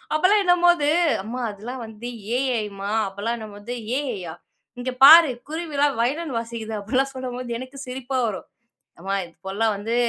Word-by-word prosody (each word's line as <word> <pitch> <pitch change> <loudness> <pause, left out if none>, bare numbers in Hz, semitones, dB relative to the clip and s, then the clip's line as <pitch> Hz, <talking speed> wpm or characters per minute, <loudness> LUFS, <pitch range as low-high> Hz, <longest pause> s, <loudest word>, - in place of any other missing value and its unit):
அப்பெல்லாம் 385 +6 +4
என்னும்போது, 350 -4 +4 0.3
அம்மா! 240 +4 -5
அதெல்லாம் 235 +6 -7
வந்து 225 +2 -8 0.3
AI 255 -5 0
ம்மா! 200 +1 -4 0.2
அப்பலாம் 200 +4 -3
என்னும்போது 215 +1 -9 0.2
AI 270 -4 -2
யா! 160 - -6 0.5
இங்க 255 +1 -2
பாரு! 320 -1 +10 0.2
குருவிலாம் 295 -4 0
வயலின் 280 +3 -1
வாசிக்குது. 230 -1 -6
அப்பிடிலாம் 265 +6 0
சொல்லும் 255 -1 -5
போது, 250 -1 -6
எனக்கு 260 +2 -9
சிரிப்பா 260 +1 -3
வரும். 205 -4 -5 0.5
அம்மா 195 +3 -3
இப்பெல்லாம் 195 +6 -2
வந்து 215 +3 -3
250 Hz, 150 wpm, -23 LUFS, 220-280 Hz, 0.5 s, பாரு